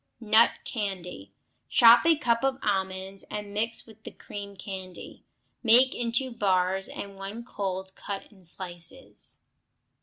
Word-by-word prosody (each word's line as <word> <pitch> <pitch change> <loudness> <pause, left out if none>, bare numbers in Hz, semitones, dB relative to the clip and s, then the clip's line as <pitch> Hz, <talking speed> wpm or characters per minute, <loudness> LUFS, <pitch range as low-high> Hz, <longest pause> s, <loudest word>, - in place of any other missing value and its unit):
Nut 225 0 +6 0.2
Candy 180 - -4 0.4
Chop 235 +5 +7
a 330 - +6
cup 235 -5 +1
of 270 -1 +1
almonds 190 -1 -2
and 205 -1 -5
mix 225 +2 -2
with 220 -1 -16
the - - -6
cream 200 -1 -8
candy; 185 -1 -8 0.4
make 250 +3 +6
into 240 +2 -1
bars, 190 -3 +1
and 200 -1 -8
when 200 +4 -6
cold 190 -4 -4
cut 200 0 -6
in 195 -3 -20
slices. 175 +7 -3
200 Hz, 130 wpm, -28 LUFS, 190-230 Hz, 0.4 s, Chop